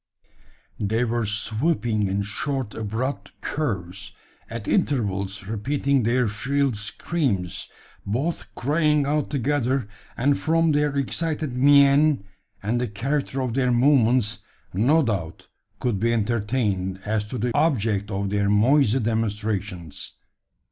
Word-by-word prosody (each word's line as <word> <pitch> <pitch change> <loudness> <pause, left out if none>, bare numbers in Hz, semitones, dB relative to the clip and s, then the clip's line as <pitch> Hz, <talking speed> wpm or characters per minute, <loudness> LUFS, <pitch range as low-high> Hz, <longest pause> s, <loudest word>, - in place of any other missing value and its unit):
They 110 +3 +1
were 120 -1 -1
swooping 110 +1 0
in 100 +1 -1
short, 130 +3 -3
abrupt 115 +6 -4
curves, 100 - -3 0.4
at 115 -2 -6
intervals 100 - 0
repeating 135 +6 0
their 120 +2 +2
shrill 135 +5 0
screams, 105 - -2 0.3
both 135 +12 -2
crying 150 +2 +2
out 150 +1 0
together, 135 -3 0 0.3
and 140 +4 +2
from 165 0 +2
their 145 -1 +1
excited 150 0 -1
mien, 140 0 +5 0.4
and 115 +4 0
the 125 - 0
character 135 +6 -2
of 125 -3 -2
their 125 -1 +2
movements, 120 -4 +3 0.3
no 135 - +3
doubt 95 -9 -3 0.3
could 120 -6 -1
be 115 +3 +2
entertained 105 -4 0
as 105 0 0
to 115 +4 -5
the 120 +1 -1
object 110 -9 +1
of 100 -1 -2
their 100 -1 +1
noisy 125 +4 +4
demonstrations. 105 - -2
120 Hz, 120 wpm, -24 LUFS, 105-140 Hz, 0.4 s, mien